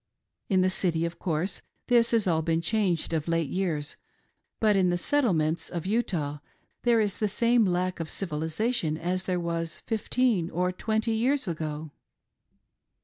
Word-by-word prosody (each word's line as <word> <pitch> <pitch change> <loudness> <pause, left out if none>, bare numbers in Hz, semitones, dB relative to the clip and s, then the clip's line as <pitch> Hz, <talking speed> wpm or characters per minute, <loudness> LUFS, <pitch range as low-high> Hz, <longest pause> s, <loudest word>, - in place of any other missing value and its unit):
In 190 -3 +4
the 185 - +3
city, 170 -3 +1
of 170 0 -5
course, 175 +2 -2 0.3
this 235 -2 +4
has 230 -3 +2
all 165 -3 +2
been 165 0 +1
changed 180 -3 0
of 155 -1 -1
late 165 -3 0
years, 160 -6 -2 0.6
but 215 -2 +4
in 185 -2 +3
the 175 - +1
Settlements 175 - +1
of 170 -1 -4
Utah 175 -9 -1 0.4
there 235 -2 +3
is 205 -3 0
the 215 - +2
same 235 +2 +3
lack 180 0 0
of 165 -1 -4
civilisation 160 +1 -1
as 185 +3 -2
there 180 -1 0
was 165 -1 -3
fifteen 225 -5 +1
or 180 +2 0
twenty 220 +4 -1
years 245 +3 +1
ago. 155 -2 -4
180 Hz, 155 wpm, -27 LUFS, 165-220 Hz, 0.6 s, In